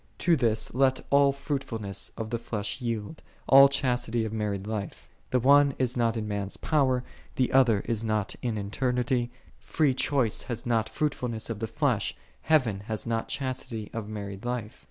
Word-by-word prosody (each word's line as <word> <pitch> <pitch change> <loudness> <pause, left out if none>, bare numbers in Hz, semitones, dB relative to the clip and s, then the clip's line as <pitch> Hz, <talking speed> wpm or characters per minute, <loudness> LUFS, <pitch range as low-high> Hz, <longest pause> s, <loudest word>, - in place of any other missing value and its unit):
To 175 -2 +3
this 115 -5 +1
let 130 +1 +3
all 140 0 +5
fruitfulness 115 -9 -3
of 110 -1 -5
the 115 - -1
flesh 105 +1 -4
yield, 115 +4 -4 0.3
all 135 +1 +9
chastity 120 -4 0
of 110 - -5
married 105 -3 -2
life; 105 -3 -5 0.2
the 125 - +2
one 140 +2 +5
is 125 -1 0
not 115 -2 +1
in 110 -1 -3
(man's) 100 -1 -3
power, 130 -5 +1 0.3
the 130 - 0
other 120 -6 +5
is 115 -1 -2
not 110 -2 -1
in 115 -3 -2
eternity; 120 +3 -1 0.3
free 150 -5 +1
choice 130 -4 +1
hath 120 -3 -5
not 115 -2 +1
fruitfulness 125 -7 -2
of 110 - -5
the 115 - -2
flesh, - - 0 0.3
heaven 125 -11 +2
hath 110 +1 -5
not 115 -1 -1
chastity 130 -5 -4
of 110 -3 -5
married 100 -2 -6
life. 120 -3 -4
115 Hz, 170 wpm, -27 LUFS, 110-130 Hz, 0.3 s, all